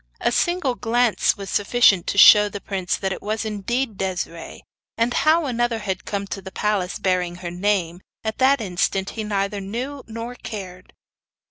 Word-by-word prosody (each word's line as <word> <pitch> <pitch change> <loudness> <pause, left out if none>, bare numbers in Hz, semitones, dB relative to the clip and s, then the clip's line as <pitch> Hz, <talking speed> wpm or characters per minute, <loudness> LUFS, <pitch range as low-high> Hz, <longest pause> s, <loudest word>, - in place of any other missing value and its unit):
A - - +1
single 345 -3 +1
glance 240 -1 +1
was 195 -1 -7
sufficient 205 -3 +3
to - - -2
show 210 +1 +8
the 205 - -6
prince 190 -3 -2
that 190 -1 -2
it - - -8
was 215 +2 -3
indeed 220 +2 -2
Desiree; 180 -3 -4 0.3
and 230 +1 +1
how 310 +3 +3
another 240 -2 0
had 195 -4 -4
come 200 -1 -3
to 195 0 -6
the 190 0 -9
palace 200 -3 -1
bearing 180 -2 0
her 175 -1 -6
name, 180 -2 -1 0.2
at 220 0 -4
that 265 0 +4
instant 190 0 -1
he 220 - -5
neither 200 -1 -2
knew 250 +8 -5
nor 230 +2 -6
cared. 190 -6 -9
205 Hz, 170 wpm, -22 LUFS, 190-235 Hz, 0.3 s, show